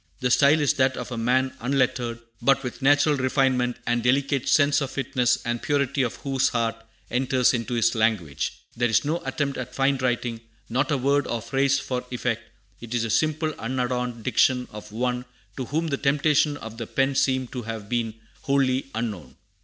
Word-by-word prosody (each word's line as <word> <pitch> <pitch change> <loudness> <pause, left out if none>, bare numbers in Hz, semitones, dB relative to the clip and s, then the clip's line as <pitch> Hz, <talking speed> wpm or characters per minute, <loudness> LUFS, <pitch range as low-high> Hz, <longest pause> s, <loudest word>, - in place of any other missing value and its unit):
The 125 -2 0
style 145 +4 +5
is 145 -2 +3
that 130 0 +2
of 125 0 -6
a - - -3
man 130 +3 +1
unlettered, 125 -2 0 0.2
but 135 +2 +3
with 125 +2 -6
natural 145 +2 +4
refinement 130 -2 +1
and 120 0 +1
delicate 135 +2 +1
sense 145 -1 +4
of 135 - -2
fitness, 125 -2 +1
the 120 0 -3
purity 140 -1 0
of 120 -3 -1
whose 135 -2 0
heart 115 -1 0 0.4
enters 130 0 +2
into 120 0 -2
his 115 0 +3
language. 105 -11 -1
There 120 0 +1
is 110 +2 +2
no 165 +4 -1
attempt 140 -4 -2
at 125 0 -6
fine 135 0 +2
writing, 120 -2 -1 0.3
not 130 +4 0
a 145 - +2
word 140 +2 +1
or 120 - -2
phrase 135 +3 +1
for 125 -2 -3
effect; 125 -2 -2 0.4
it 120 0 -6
is 115 - +1
the 115 - -2
simple 155 +4 +1
unadorned 125 -1 -2
diction 125 0 +2
of 105 0 -10
one 125 +2 -2 0.3
to 130 - -4
whom 160 +5 -1
the 140 - 0
temptations 145 +1 +2
of 115 -2 -9
the 115 - -4
pen 135 +1 +1
seem 130 -1 +1
to 125 - -5
have 110 -2 -6
been 115 -1 -1 0.3
wholly 135 -1 +1
unknown. 105 - -4
125 Hz, 185 wpm, -25 LUFS, 120-140 Hz, 0.4 s, style